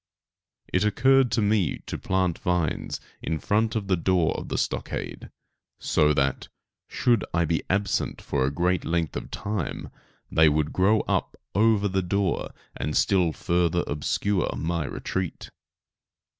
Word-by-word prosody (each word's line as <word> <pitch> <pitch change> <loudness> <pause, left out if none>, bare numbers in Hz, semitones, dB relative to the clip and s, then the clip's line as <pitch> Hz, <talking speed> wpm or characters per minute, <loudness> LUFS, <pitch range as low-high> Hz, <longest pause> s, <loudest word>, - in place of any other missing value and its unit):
It 90 - +3
occurred 130 +5 +4
to 115 - +2
me 100 -6 +1
to - - -5
plant 95 -2 0
vines 90 -3 -1 0.2
in 80 - -2
front 110 +8 0
of 110 -3 -1
the 95 -1 +2
door 90 -1 +1
of - - -6
the - - -2
stockade, - - -3 0.5
so 75 0 +3
that, 70 -1 0 0.4
should 120 -6 +2
I 85 0 +3
be 80 +1 0
absent 100 0 0
for 70 -2 -1
a 65 - +2
great 90 +5 0
length 85 -1 -1
of - - -5
time, 100 -7 -4 0.4
they 80 -1 +6
would 75 0 0
grow 105 +4 +3
up - - -1 0.2
over 105 0 +3
the 95 0 0
door 95 0 -1 0.3
and 75 - -2
still 90 -4 +3
further 85 +1 +1
obscure 90 +6 0
my 85 -1 -1
retreat. 95 +4 -4
90 Hz, 145 wpm, -26 LUFS, 80-100 Hz, 0.5 s, they